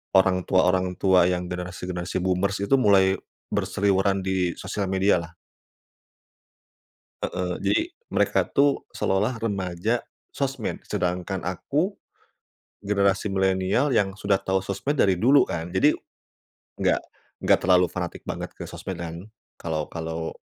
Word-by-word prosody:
orang 95 -1 +4
tua-orang 90 0 +2
tua 95 -2 +5
yang 90 0 -1
generasi-generasi 90 0 -4
boomers 95 +2 0
itu 100 - +3
mulai 100 -6 +4 0.4
berseliweran 100 0 +1
di 95 -2 0
sosial 100 -2 -3
media 95 -1 +3
lah. 85 0 -8 1.9
Heeh. 90 -1 -2
Jadi, 335 - +2 0.3
mereka - - +2
tuh 140 0 +2
seolah-olah 105 +6 0
remaja 100 +1 -1 0.3
sosmed, 135 -4 -3
sedangkan 90 +1 -2
aku, 150 - -1 0.9
generasi 100 0 +1
milenial 95 +7 +1
yang 100 -3 +1
sudah 100 -1 +1
tahu 95 0 +1
sosmed 135 +10 -2
dari 95 -7 +4
dulu 125 +10 +5
kan, 85 0 -4
jadi - - +4 0.9
enggak - - +2 0.4
enggak - - +3
terlalu 90 0 +5
fanatik 85 0 -5
banget - - -4
ke - - -6
sosmed 95 - -6
kan, 85 0 -6 0.4
kalau 80 -2 -2
kalau 80 0 -5
95 Hz, 125 wpm, -25 LUFS, 90-100 Hz, 1.9 s, tua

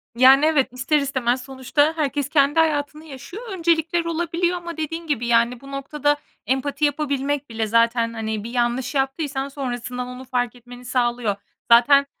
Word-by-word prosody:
Yani, 265 +4 +7
evet, 290 -5 +2
ister 255 +5 +1
istemez 260 -3 0
sonuçta 270 +4 0
herkes 285 -2 -1
kendi 290 +1 +3
hayatını 305 -1 0
yaşıyor. 315 - -9
Öncelikler 335 -2 +1
olabiliyor 340 +1 -1
ama 340 -1 -7
dediğin 325 +2 -4
gibi, 240 -6 -1
yani, 235 +1 +2
bu 275 - -11
noktada 290 +1 -1 0.3
empati 280 +3 0
yapabilmek 285 -1 -1
bile 225 -1 -2
zaten, 230 +1 +2
hani, 220 -2 -3
bir 230 - -6
yanlış 245 +3 -1
yaptıysan 270 0 -1
sonrasından 250 -2 -4
onu 250 +1 -8
fark 245 -2 -1
etmeni 245 +1 -13
sağlıyor. 240 -4 0 0.4
Zaten 275 +4 +6
270 Hz, 150 wpm, -22 LUFS, 245-300 Hz, 0.4 s, Yani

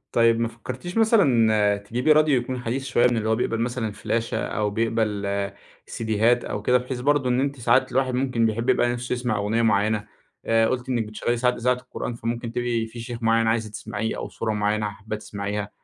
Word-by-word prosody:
طيب 115 -1 +4
ما 115 - +1
فكرتيش 125 - -7
مثلًا 115 - +4
تجيبي 120 +9 +1
راديو 150 -4 +4
يكون 125 +1 -4
حديث 130 +3 -2
شوية 125 -2 +3
من 120 - +2
اللي 110 0 -1
هو 110 - +2
بيقبل 115 -1 -1
مثلًا 120 -1 -1
الفلاشة، 110 +2 -2
أو 105 -1 -1
بيقبل 110 -2 -1 0.6
سيديهات 115 +2 +1
أو 105 - -4
كده، 125 +2 +4
بحيث 125 0 -5
برضه 140 0 +2
إن 125 +1 +2
أنتِ 140 0 -2
ساعات 130 +3 +3
الواحد 130 0 +1
ممكن 125 -3 +1
بيحب 115 +3 -2
يبقى 120 -1 +2
نفسه 120 +1 -4
يسمع 120 -3 -1
أغنية 105 +3 0
معيّنة، 105 0 +1 0.4
آآ، 115 0 +3
قُلتِ 125 0 -2
إنك 120 -4 0
بتشغلي 110 +3 -2
ساعات 125 +1 +2
إذاعة 125 +2 +2
القرآن 125 -1 -6
فممكن 115 0 -4
تبقي 120 -2 -1
في 115 +1 -9
شيخ 115 0 -7
معيّن 115 0 +3
عايزة 110 -1 0
تسمعيه، 105 +1 -4
أو - - -5
سورة 110 -1 -3
معيّنة 105 0 0
حابة 105 +2 -6
تسمعيها. 105 0 -4
115 Hz, 195 wpm, -24 LUFS, 110-125 Hz, 0.6 s, طيب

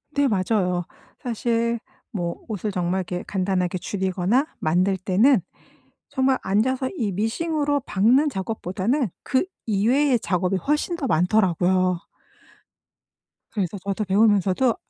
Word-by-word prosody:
네 285 -1 +3
맞아요. 185 -4 0 0.4
사실 235 -1 0 0.3
뭐 175 -4 -3
옷을 210 -1 -3
정말 180 0 -1
이렇게 180 0 -4
간단하게 185 -2 0
줄이거나 190 - 0
만들 180 +4 +2
때는 195 +5 +3 0.7
정말 265 -2 +2
앉아서 255 +7 +1
이 215 -6 -1
미싱으로 290 - 0
박는 250 +10 +3
작업보다는 210 - -1
그 265 +6 +1 0.2
이외의 240 +5 +2
작업이 185 0 0
훨씬 300 - 0
더 285 -6 -3
많더라고요. 180 -1 +2 1.5
그래서 200 -2 -2
저도 200 +2 -2
배우면서도 205 +3 +3
205 Hz, 275 characters per minute, -23 LUFS, 185-255 Hz, 1.5 s, 네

